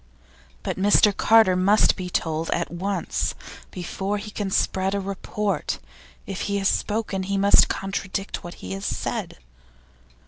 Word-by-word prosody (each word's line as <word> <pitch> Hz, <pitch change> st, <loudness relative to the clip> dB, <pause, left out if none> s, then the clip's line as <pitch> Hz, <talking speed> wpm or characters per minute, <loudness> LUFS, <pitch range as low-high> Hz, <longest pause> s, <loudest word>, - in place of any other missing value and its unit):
But -, -, -3 dB
Mr 205 Hz, 0 st, +5 dB
Carter 220 Hz, -4 st, +5 dB
must 195 Hz, +4 st, +4 dB
be 185 Hz, -2 st, -5 dB
told 160 Hz, -1 st, -1 dB
at -, -, -1 dB
once, 190 Hz, +3 st, -2 dB, 0.3 s
before 190 Hz, +3 st, -3 dB
he 210 Hz, +1 st, -7 dB
can 205 Hz, -1 st, -3 dB
spread 190 Hz, +1 st, +1 dB
a -, -, 0 dB
report. 200 Hz, +1 st, -2 dB, 0.5 s
If 195 Hz, -1 st, -5 dB
he 200 Hz, -, 0 dB
has 195 Hz, -1 st, +1 dB
spoken, 210 Hz, -3 st, -1 dB
he 195 Hz, +1 st, -1 dB
must 200 Hz, +1 st, +6 dB
contradict 195 Hz, 0 st, -3 dB
what 175 Hz, 0 st, -8 dB
he 90 Hz, -, -9 dB
has 95 Hz, 0 st, -5 dB
said. -, -, -3 dB
195 Hz, 145 wpm, -24 LUFS, 185-205 Hz, 0.5 s, must